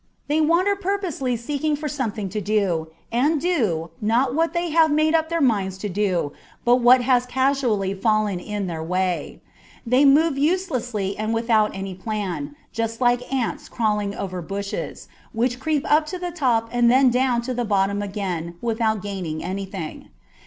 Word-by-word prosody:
They 305 +2 +2
wander 345 +6 +3
purposelessly 365 - -2
seeking 295 +5 -1
for 300 +1 -4
something 230 -8 -3
to 210 +3 -3
do, 195 -6 0 0.2
and 285 +7 +2
do, 215 - 0
not 240 +4 +2
what 330 +3 +1
they 345 -1 -2
have 320 0 +5
made 310 +1 +2
up 320 -1 +2
their 335 0 0
minds 200 -7 +1
to 205 +2 -4
do, 185 -6 0 0.3
but 240 +1 +5
what 250 +1 +6
has 250 0 +2
causually 250 -7 +1
fallen 210 -1 +1
in 205 +1 -4
their 165 -3 -4
way. 180 +2 -2 0.4
They 250 +4 +4
move 285 +1 +4
uselessly 250 - 0
and 215 +1 -1
without 225 -3 +2
any 195 0 -5
plan, 185 -7 -4 0.2
just 230 0 -3
like 245 0 +1
ants 260 -4 -2
crawling 210 -3 -1
over 185 -2 -4
bushes, 200 +3 -5 0.3
which 245 +2 0
creep 305 -1 0
up 305 +1 +3
to 365 - -4
the 355 -1 -4
top 245 -9 +1
and 240 -1 +3
then 260 +1 +5
down 250 -1 +1
to 255 +1 -3
the 245 0 -1
bottom 200 -1 +1
again 185 -4 -4
without 220 -2 0
gaining 185 -6 -4
anything. 190 -2 -5
230 Hz, 165 wpm, -23 LUFS, 200-275 Hz, 0.4 s, what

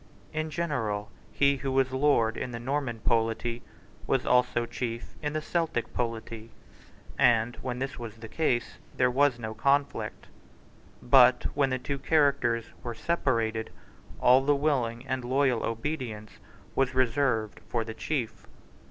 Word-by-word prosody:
In 155 0 -2
general 125 -11 -2 0.2
he 140 0 +3
who 135 0 -3
was 130 -1 +2
lord 130 -5 +2
in - - -4
the 120 -1 -6
Norman 130 -2 -2
polity 115 +1 0 0.5
was 135 -2 +1
also 125 -1 +3
chief 115 -1 -5
in 150 -1 -2
the 155 0 -2
Celtic 165 -7 -1
polity; 115 -1 -4 0.7
and, 115 0 +4
when 125 -1 -4
this 130 0 -4
was 115 -3 -7
the 115 0 -10
case, 120 -3 -1 0.2
there 125 -1 +3
was 140 -1 +3
no 110 -2 -5
conflict. 140 +5 0 0.8
But, 125 0 +6
when 140 -2 +2
the 130 - 0
two 140 +2 -4
characters 140 -6 +2 0.2
were 120 -1 -5
separated, 115 -7 0 0.5
all 130 +2 +5
the 145 +1 +3
willing 130 -5 0
and 130 -2 -2
loyal 130 -1 +1
obedience 115 -4 -4 0.4
was 130 -1 +1
reserved 125 -4 +1
for 115 -2 0
the 110 0 -6
chief. 125 -1 -3
125 Hz, 145 wpm, -28 LUFS, 115-140 Hz, 0.8 s, But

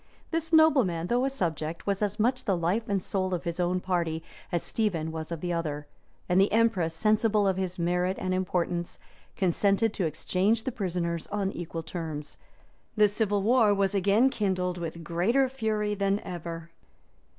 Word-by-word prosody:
This 325 0 -2
nobleman, 265 - +4
though 245 +6 +1
a - - +1
subject, 165 - -3
was 200 0 -1
as 210 +1 -1
much 250 +4 +1
the 195 -3 +1
life 185 +7 -1
and 195 -2 0
soul 185 -2 -1
of 175 - -5
his 170 0 -4
own 180 +1 +1
party, 170 -3 -1 0.3
as 175 -2 0
Stephen 170 -8 -1
was 160 0 -6
of 165 -2 -4
the 175 -1 -2
other: 150 -3 -3 0.4
and 180 +1 +4
the 195 - +3
empress, 205 -8 +2
sensible 215 +1 +2
of 190 - +2
his 185 -1 -2
merit 180 +2 0
and 185 0 -1
importance, 175 -2 -1 0.4
consented 200 +4 +2
to 180 - 0
exchange 190 +8 0
the 260 - -2
prisoners 170 -6 -2
on 200 -2 -1
equal 165 -2 -5
terms. 160 -3 -6 0.6
The 210 -1 +6
civil 205 -1 0
war 220 -2 +4
was 195 0 +1
again 205 +7 +3
kindled 185 -6 -1
with 165 0 -5
greater 190 - +2
fury 220 -5 -1
than 200 0 +1
ever. 165 -1 -7
185 Hz, 175 wpm, -28 LUFS, 170-210 Hz, 0.6 s, The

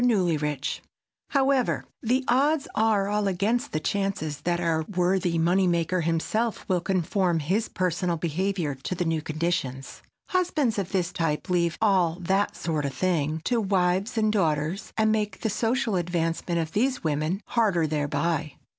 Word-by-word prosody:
NEWLYRICH] 155 - +1 0.5
However, 270 -2 +2 0.2
the 255 +3 +1
odds 285 +4 +2
are 215 -3 +2
all 210 0 0
against 220 +8 0
the 155 - -1
chances 185 -6 -2
that 175 +2 0
our 165 -2 +1
worthy 180 -1 +1
money 180 +3 +3
maker 170 +1 +1
himself 170 +8 -1
will 180 -3 +1
conform 185 -1 +1
his 185 +9 0
personal 180 -1 -1
behavior 170 -1 -1
to 135 +7 -5
the 175 - -1
new 165 -1 0
conditions. 155 -4 -3 0.3
Husbands 310 - +1
of 190 -2 -3
his 185 -2 -1
type 165 +1 -1
leave 170 -2 +1
"all 185 -6 +3
that 190 +3 +1
sort 155 -3 -2
of 135 -1 -3
thing" 160 -1 0
to 240 -2 +1
wives 190 +3 +1
and 215 -1 +2
daughters, 160 -1 0
and 220 0 +3
make 210 -3 -1
the 220 - 0
social 225 +1 0
advancement 170 -1 -1
of 160 -1 -2
these 250 +6 0
women 155 +4 0
harder 200 -9 +2
thereby. 150 0 -1
180 Hz, 155 wpm, -26 LUFS, 165-210 Hz, 0.5 s, money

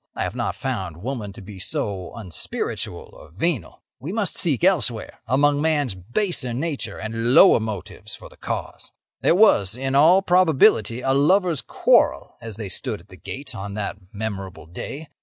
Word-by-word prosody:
I - - -1
have - - -3
not - - -2
found 95 -11 -4
woman 120 -5 -4
to - - -11
be 100 -1 -10
so 95 0 -3
unspiritual 95 -8 -4
or 75 - -14
venal. 125 - -2 0.2
We 150 - -5
must 210 -2 -1
seek 160 -4 +1
elsewhere, 150 - +1
among 145 +3 +3
man's 150 -7 +1
baser 120 - -2
nature 135 -7 -3
and 115 +3 0
lower - - +8
motives 105 -1 -6
for - - -12
the - - -18
cause. - - -5 0.3
"There - - +4
was, 110 - +4
in 135 +1 -2
all 165 +7 +6
probability, 160 - +4
a 135 +1 +1
lover's 165 +2 +3
quarrel - - +2
as 115 -2 -7
they 110 -3 -5
stood 90 - -3
at 90 +4 -20
the 90 - -12
gate 130 - -8
on 100 -1 -6
that 105 -1 -3
memorable 100 -5 -5
day. 135 - -7
120 Hz, 170 wpm, -23 LUFS, 100-150 Hz, 0.3 s, lower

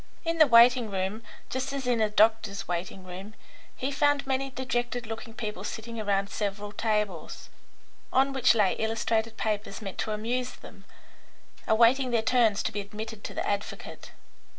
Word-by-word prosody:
In 330 0 -1
the 310 - +8
waiting 240 -1 +6
room, 195 +3 -2 0.3
just 260 +1 -2
as 275 -2 -3
in 245 -2 +1
a 215 - +3
doctor's 210 -2 +2
waiting 180 +2 -4
room, 190 +4 -9 0.4
he 265 +2 -2
found 290 0 +2
many 270 0 -1
dejected 245 -2 -2
looking 225 +1 -7
people 215 -3 -5
sitting 230 0 -5
round 200 0 0
several 205 0 -3
tables, 210 -6 -2 0.6
on 270 +1 +3
which 265 -3 +4
lay 205 -4 +3
illustrated 225 0 0
papers 210 -2 -2
meant 195 -3 -7
to 215 - -1
amuse 245 +4 -2
them, - - -14 0.8
awaiting 240 +4 +4
their 230 -2 +1
turns 225 -3 +3
to - - -1
be 205 - -3
admitted 215 +1 -8
to - - -6
the - - -2
advocate. 205 0 -4
220 Hz, 160 wpm, -28 LUFS, 205-250 Hz, 0.8 s, the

